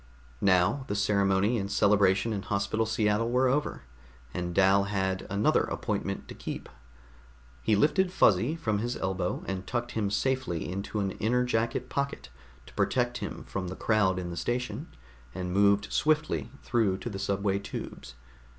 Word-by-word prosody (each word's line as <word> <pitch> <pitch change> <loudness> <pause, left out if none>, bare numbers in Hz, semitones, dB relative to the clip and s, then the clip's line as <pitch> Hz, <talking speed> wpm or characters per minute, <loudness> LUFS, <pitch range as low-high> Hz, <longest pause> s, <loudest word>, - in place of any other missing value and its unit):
Now 95 +7 +3
the 100 - -2
ceremony 100 +2 +2
and 100 0 -4
celebration 100 +1 +3
in 100 - -2
Hospital 100 +3 -1
Seattle 110 +1 +1
were 125 +2 +3
over, 140 +4 0 0.5
and 90 -1 -3
Dal 95 +2 +4
had 95 -2 -1
another 100 +2 +3
appointment - - -3
to - - -8
keep. - - -6 0.9
He 110 - +2
lifted 180 - +3
Fuzzy 115 - +3
from 110 -11 -1
his 120 +3 -2
elbow 95 -1 -2
and 95 -1 -4
tucked 120 +1 -2
him 105 -3 -1
safely 130 -5 -1
into 100 +3 -3
an 95 -1 -1
inner 120 +4 +2
jacket 115 -1 -1
pocket 140 - -3 0.4
to - - -15
protect 125 -1 0
him - - -5
from 95 -2 -4
the 95 - -5
crowd 105 -4 +2
in 90 -1 -4
the 85 - -6
station, 125 - -2 0.5
and 90 -1 -3
moved 100 +1 +3
swiftly 155 -4 +1
through 110 -6 +1
to 95 - -7
the 95 - -5
subway 100 0 0
tubes. 100 -10 -7
100 Hz, 160 wpm, -29 LUFS, 95-120 Hz, 0.9 s, Dal